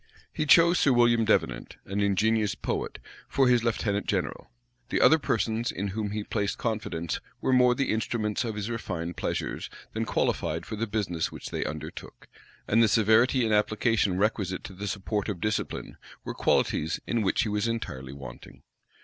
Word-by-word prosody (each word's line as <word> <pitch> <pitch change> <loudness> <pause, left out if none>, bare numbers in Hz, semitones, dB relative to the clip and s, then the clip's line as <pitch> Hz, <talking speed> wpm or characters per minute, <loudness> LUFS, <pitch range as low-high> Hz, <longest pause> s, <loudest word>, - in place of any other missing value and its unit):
He 155 - -2
chose 170 +4 +6
Sir 140 - +4
William 120 -2 +4
Devenant, 65 - 0
an 100 +1 -2
ingenious 105 +1 +2
poet, - - -3 0.3
for 135 -1 +3
his 120 -2 +4
lieutenant 105 -3 -1
general: - - -2 0.4
the - - +1
other 160 - +6
persons 115 -3 0
in 100 +1 -3
whom 105 +1 -3
he 105 +1 -3
placed 100 -1 -2
confidence 105 -8 -2 0.2
were 130 - +1
more 125 -1 +5
the 135 +1 0
instruments 110 0 -1
of 115 -3 -3
his 105 -1 -3
refined 90 -7 -4
pleasures, - - -3 0.2
than - - -1
qualified - - -1
for 110 - -5
the 115 +2 -2
business 95 -6 -2
which - - -8
they - - -1
undertook; 75 +2 -7 0.4
and 115 +2 +4
the 115 - +6
severity 115 +4 +4
and 110 - +1
application 105 -2 +2
requisite 100 -2 0
to 100 - -8
the 100 +3 -6
support 100 +1 -2
of 95 -4 -3
discipline, 105 +3 -3 0.3
were - - -5
qualities 80 +2 +1
in 120 - 0
which 100 +1 +2
he 110 - -2
was 105 +2 0
entirely 65 - -4
wanting. 65 -3 -11
105 Hz, 175 wpm, -27 LUFS, 100-115 Hz, 0.4 s, chose